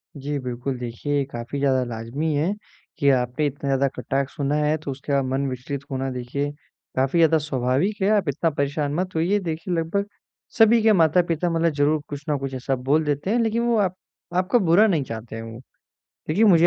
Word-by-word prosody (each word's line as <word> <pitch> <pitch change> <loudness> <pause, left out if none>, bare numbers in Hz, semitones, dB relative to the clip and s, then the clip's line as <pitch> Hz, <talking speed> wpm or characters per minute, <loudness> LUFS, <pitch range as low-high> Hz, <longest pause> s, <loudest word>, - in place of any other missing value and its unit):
जी, 145 +1 -3
बिल्कुल 125 +1 -4
देखिए 125 +4 -2
ये 140 - +2
काफ़ी 120 +4 -5
ज़्यादा 130 -2 +2
लाज़िमी 120 +7 -3
है 165 +8 +1 0.4
कि 140 - +3
आपने 125 +2 +1
इतना 140 0 -5
ज़्यादा 135 0 +2
कटाक्ष 135 0 -2
सुना 145 +1 0
है 150 +1 +2
तो 140 - -4
उसके 140 +2 -6
बाद 140 -1 +3
मन 135 +2 -1
विचलित 130 +2 -5
होना 135 0 -2
देखिए, 130 +4 -3 0.4
काफ़ी 135 +5 +1
ज़्यादा 160 -1 +5
स्वाभाविक 145 - 0
है, 195 - +3
आप 200 -8 +2
इतना 160 +4 +1
परेशान 145 0 -1
मत 185 0 -2
होइए, 185 +6 +2
देखिए 165 0 -3
लगभग 170 +5 0 0.5
सभी 225 0 +6
के 220 -1 +6
माता-पिता 170 0 +3
मतलब 165 0 +2
ज़रूर 145 +1 +2
कुछ 145 0 -6
न 145 - +2
कुछ 135 -1 -4
ऐसा 130 +1 -1
बोल 135 +5 +1
देते 145 +5 -1
हैं, 235 +3 +2
लेकिन 230 0 +1
वो 235 -1 +2
आप 185 -2 +1 0.4
आपका 185 +7 +3
बुरा 185 +3 +5
नहीं 165 -8 +1
चाहते 115 -2 -7
हैं 115 - -5
वो। 115 +1 -9 0.7
देखिए, 195 +9 +3
मुझे 175 -4 +6
145 Hz, 200 wpm, -23 LUFS, 135-170 Hz, 0.7 s, सभी